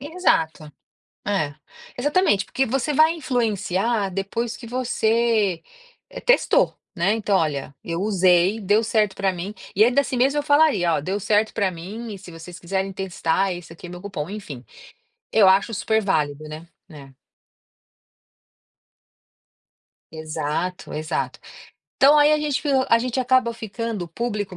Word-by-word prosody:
Exato. 280 - 0 0.6
É. 155 -8 -1 0.4
Exatamente. 290 - +2
Porque 260 +8 -1
você 270 +4 -1
vai 315 +3 +4
influenciar 225 - -1
depois 210 +4 -3
que 230 - -11
você, 230 -5 +1 0.5
eh, - - -8
testou, - - +3 0.2
né. 185 +3 +1
Então: 210 -3 0
“Olha, 140 -3 -2
eu 170 0 -4
usei, 190 0 +3
deu 210 +3 +2
certo 215 -3 +1
pra 195 -1 0
mim”. 185 +4 -6 0.2
E 210 +3 +5
ainda 245 +4 +3
assim 265 -2 -4
mesmo 275 +4 +2
eu - - 0
falaria: 285 - +3
“Ó, - - 0
deu 190 +7 -2
certo 210 +2 +1
pra 200 -4 +1
mim, 205 +7 -8
e 195 - -9
se 185 -2 -12
vocês 170 +2 -10
quiserem 190 +2 -3
testar, 190 0 -1
esse 175 -2 -9
aqui 165 - -11
é 175 - -10
meu 180 - -9
cupom”, 185 -7 -5
enfim. 170 - -8 0.7
Eu 210 -3 +5
acho 200 +4 +3
superválido, 160 -10 0
né. 155 +2 -9 0.2
É. 140 -4 -13 3.0
Exato, 155 +3 -4
exato. 155 +1 -3 0.6
Então 290 +2 +6
aí 295 +1 +5
a 305 - +3
gente 295 -2 -1
f 265 -2 +2
a 230 - +5
gente 255 +2 -2
acaba 255 -1 +2
ficando, 225 -3 -5
o - - -12
público 205 -1 -4
205 Hz, 150 wpm, -22 LUFS, 175-235 Hz, 3.0 s, Então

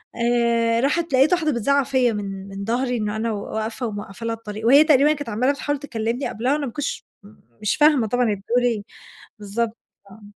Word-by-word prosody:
آآ 235 -1 +2
راحت 310 +2 0
لَقيت 270 +6 +4
واحدة 320 -4 +1
بتزعّق 280 +3 +2
فيّا 255 -4 +2
من 195 -2 -5
من 195 0 -6
ضهري 245 +2 0
إنّه 210 -1 -2
أنا 225 +1 -1
و 205 0 -5
واقفة 220 +3 -3
وموقّفة 205 +1 -7
لها 230 0 -1
الطريق 220 -1 -8
وهي 280 +4 +8
تقريبًا 300 -1 +4
كانت 290 -5 -6
عمّالة 250 +6 +1
بتحاول 290 0 -3
تكلمني 235 -2 -3
قبلها 250 +6 -1
وأنا 295 -1 -1
ما 245 - -5
كنتش 290 -1 -4 0.6
مش 210 - +1
فاهمة 295 -6 +4
طبعًا 245 +1 +1
هي - - 0
بتقول 235 +5 -1
إيه. 230 -4 0 0.6
بالضبط، 220 +3 -3 0.3
آه. 220 +1 -15
235 Hz, 195 wpm, -22 LUFS, 220-275 Hz, 0.6 s, وهي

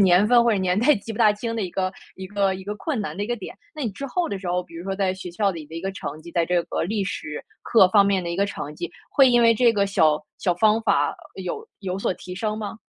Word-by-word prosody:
年 190 +1 +5
份 240 +1 +6
或 235 - +3
者 215 - +2
年 185 +1 +1
代 275 +6 +5
记 220 +2 -7
不 - - -8
大 215 -3 +6
清 230 +2 -4
的 225 - -1
一 180 - -3
个 185 +1 -1 0.2
一 190 - -7
个 200 -1 +1
一 190 0 -8
个 210 - -4
困 280 0 -2
难 155 -6 -5
的 200 - -2
一 - - -2
个 240 +1 -1
点。 205 - -8 0.2
那 305 - -5
你 235 - -1
之 275 +8 -6
后 345 +5 -1
的 200 - -3
时 185 -2 -6
候， 180 +1 0
比 170 - -17
如 170 +2 -7
说 195 - -2
在 190 -2 +1
学 185 -1 -7
校 200 +3 +1
里 165 -5 -7
的 160 - -12
一 165 - -4
个 195 +2 -3
成 155 -4 -6
绩， 170 - -10
在 170 - +2
这 175 0 +2
个 - - -2
历 205 +2 -1
史 155 -5 -5 0.2
课 220 -5 +6
方 200 +1 +5
面 195 -2 +2
的 170 - -4
一 170 - -3
个 200 +1 +2
成 150 -6 -6
绩， 170 +2 -5 0.2
会 270 -3 +6
因 240 -1 +5
为 230 0 +6
这 235 +1 +4
个 200 -2 +2
小 155 -6 +3 0.2
小 180 - +1
方 215 +4 +3
法 - - +2 0.2
有 455 -2 -5
有 190 -1 -3
所 195 - 0
提 180 +1 -9
升 215 +2 -2
吗？ 210 0 -6
195 Hz, 325 characters per minute, -24 LUFS, 180-220 Hz, 0.2 s, 份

